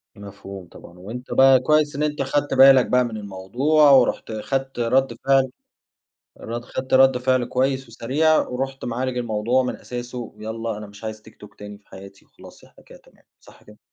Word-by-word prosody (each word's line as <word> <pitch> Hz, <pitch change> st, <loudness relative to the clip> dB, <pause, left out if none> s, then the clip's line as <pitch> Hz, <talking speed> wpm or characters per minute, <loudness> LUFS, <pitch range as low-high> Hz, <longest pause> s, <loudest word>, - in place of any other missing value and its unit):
مفهوم 100 Hz, -2 st, -11 dB
طبعًا. 85 Hz, +1 st, -15 dB
وأنتَ 120 Hz, +7 st, -8 dB
بقى 135 Hz, -1 st, +6 dB
كويِس 150 Hz, +1 st, +1 dB
إن 150 Hz, -, -2 dB
أنتَ 150 Hz, -1 st, -2 dB
خدت 140 Hz, +1 st, -1 dB
بالَك 135 Hz, -1 st, +7 dB
بقى 125 Hz, 0 st, +2 dB
من 110 Hz, -2 st, -6 dB
الموضوع، 120 Hz, +10 st, +1 dB
ورُحت 125 Hz, -3 st, +3 dB
خدت 135 Hz, +4 st, -4 dB
ردّ 125 Hz, +1 st, +1 dB
فعل 135 Hz, -1 st, +3 dB, 0.9 s
رد 120 Hz, +1 st, -6 dB
خدت 130 Hz, 0 st, -4 dB
ردّ 130 Hz, -1 st, +5 dB
فعل 130 Hz, -1 st, +1 dB
كويِس 130 Hz, 0 st, -1 dB
وسريع، 145 Hz, +8 st, +1 dB
ورُحت 135 Hz, +1 st, -5 dB
معالج 125 Hz, +1 st, -3 dB
الموضوع 120 Hz, +2 st, 0 dB
من 125 Hz, -, -4 dB
أساسه. 125 Hz, 0 st, -8 dB, 0.2 s
ويالَّا، 110 Hz, 0 st, -5 dB
"أنا 105 Hz, -, -8 dB
مش 100 Hz, +2 st, -14 dB
عايِز 110 Hz, 0 st, -6 dB
TikTok 105 Hz, -, -16 dB
تاني 105 Hz, 0 st, -10 dB
في 100 Hz, -, -35 dB
حياتي،" 100 Hz, +1 st, -14 dB
وخلاص -, -, -17 dB
إحنا -, -, -21 dB
كده -, -, -16 dB
تمام. -, -, -25 dB, 0.2 s
صح -, -, -19 dB
كده؟ 105 Hz, 0 st, -18 dB
125 Hz, 175 wpm, -22 LUFS, 110-135 Hz, 0.9 s, بالَك